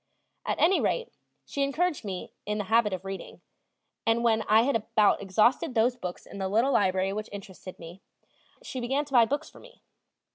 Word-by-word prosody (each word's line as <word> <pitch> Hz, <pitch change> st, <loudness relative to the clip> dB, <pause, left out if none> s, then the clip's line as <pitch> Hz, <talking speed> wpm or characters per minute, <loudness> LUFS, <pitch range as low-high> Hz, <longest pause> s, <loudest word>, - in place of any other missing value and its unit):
At -, -, -1 dB
any 370 Hz, +4 st, +4 dB
rate 475 Hz, -1 st, -1 dB, 0.3 s
she 280 Hz, -, -4 dB
encouraged 305 Hz, +3 st, 0 dB
in -, -, -5 dB
me 185 Hz, -2 st, -6 dB
the 210 Hz, 0 st, -1 dB
habit 220 Hz, +1 st, +3 dB
of 185 Hz, 0 st, -5 dB
reading, 195 Hz, 0 st, -7 dB, 0.6 s
and 225 Hz, +1 st, +2 dB
when 225 Hz, -2 st, +3 dB
I 220 Hz, +2 st, +6 dB
had 275 Hz, 0 st, +1 dB
about 215 Hz, -1 st, +2 dB
exhausted 215 Hz, +6 st, +2 dB
those 235 Hz, +2 st, +3 dB
books 180 Hz, -7 st, -7 dB
in 200 Hz, -, -10 dB
the 190 Hz, 0 st, -2 dB
little 235 Hz, +7 st, +2 dB
library 190 Hz, 0 st, +2 dB
which 215 Hz, +1 st, -5 dB
interested 190 Hz, -2 st, -9 dB
me, 170 Hz, +3 st, -11 dB, 0.6 s
she 265 Hz, -, -5 dB
began 270 Hz, +4 st, -1 dB
to 275 Hz, -, -13 dB
buy 240 Hz, -2 st, +7 dB
books 285 Hz, +6 st, -3 dB
for -, -, -15 dB
me. -, -, -18 dB
220 Hz, 190 wpm, -28 LUFS, 195-265 Hz, 0.6 s, buy